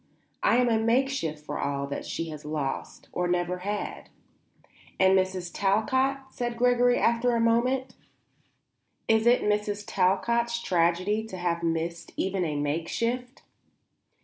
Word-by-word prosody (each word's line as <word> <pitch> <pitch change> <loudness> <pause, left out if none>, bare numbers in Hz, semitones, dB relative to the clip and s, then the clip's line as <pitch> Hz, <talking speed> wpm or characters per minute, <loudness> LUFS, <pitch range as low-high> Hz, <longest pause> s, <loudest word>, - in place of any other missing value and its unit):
I 235 - +4
am 250 0 +3
a 225 -2 +2
makeshift 230 - 0
for - - -4
all 140 0 -1
that 140 0 -5
she 165 0 -3
has 150 -1 -8
lost, 150 -3 -4
or 180 0 -1
never 175 0 0
had." 205 +2 -4 0.9
"And 190 0 +5
Mrs. 185 -2 0
Talcott?" 260 +7 +1 0.2
said 240 -2 -3
Gregory 245 0 +4
after 235 +1 +2
a - - +1
moment. 245 +3 +1 1.1
"Is 220 +1 +3
it 245 +1 +5
Mrs. 210 0 0
Talcott's 235 +5 +1
tragedy 185 +3 +1
to 190 -4 -8
have 175 -1 -1
missed 165 0 -2
even 190 -1 0
a 155 -3 -2
makeshift?" 230 - -2
205 Hz, 135 wpm, -27 LUFS, 170-235 Hz, 1.1 s, And